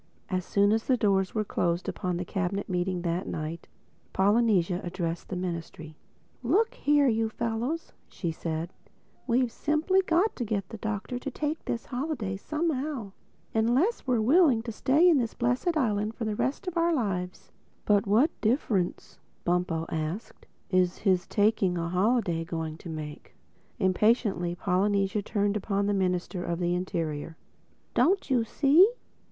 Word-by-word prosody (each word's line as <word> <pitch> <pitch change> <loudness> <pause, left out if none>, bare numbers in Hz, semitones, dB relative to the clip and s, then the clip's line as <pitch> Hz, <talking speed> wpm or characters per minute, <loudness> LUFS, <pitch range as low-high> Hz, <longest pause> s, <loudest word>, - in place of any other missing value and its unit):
As 185 -1 -1
soon 200 +2 +2
as 220 +1 +1
the 255 - +3
doors 195 -3 +1
were 215 - +1
closed 175 -3 -1
upon 180 -3 -2
the 180 - -3
Cabinet 195 +1 -2
Meeting 180 -1 -1
that 175 +1 -1
night, 155 +2 -5 0.5
Polynesia 195 -3 +3
addressed 170 -1 -4
the 190 - -3
Ministry: 170 -3 -5 0.5
"Look 390 - +2
here, 290 - +3
you 225 -2 +1
fellows," 235 +8 -3 0.2
said 165 -1 -3
she: - - -32 0.4
"we've 245 0 +2
simply 310 +9 +1
got 370 +4 +1
to 245 - -2
get 200 -4 -2
the 225 - -8
Doctor 220 +3 -3
to 275 - -4
take 300 +3 -3
this 235 - -3
holiday 245 -7 -3
somehow—unless 270 - -2
we're 250 -3 +2
willing 265 -1 +4
to 230 - -4
stay 280 +10 +3
in 325 -6 +5
this 230 -2 -2
blessed 255 +8 0
island 215 -4 0
for 230 - -4
the 215 -1 -1
rest 275 - -2
of 365 -2 -4
our 335 +1 +3
lives." 185 -8 -3 0.3
"But 205 -1 +3
what 235 +11 +4
difference," 215 -6 -1 0.3
Bumpo 175 -2 0
asked, 160 +7 -5 0.2
"is 180 -1 +2
his 185 -3 +1
taking 205 -4 +2
a 170 0 -2
holiday 185 -2 +1
going 160 -2 -5
to 170 - -9
make?" 155 -2 -7 0.4
Impatiently 190 -2 +2
Polynesia 195 +2 +1
turned 205 0 0
upon 200 -1 0
the 205 - +1
Minister 180 -1 -1
of 170 -1 -2
the 175 0 0
Interior. 165 -3 -3 0.6
"Don't 380 -5 +2
you 245 -3 +3
see? 305 - +5
205 Hz, 150 wpm, -28 LUFS, 180-250 Hz, 0.6 s, in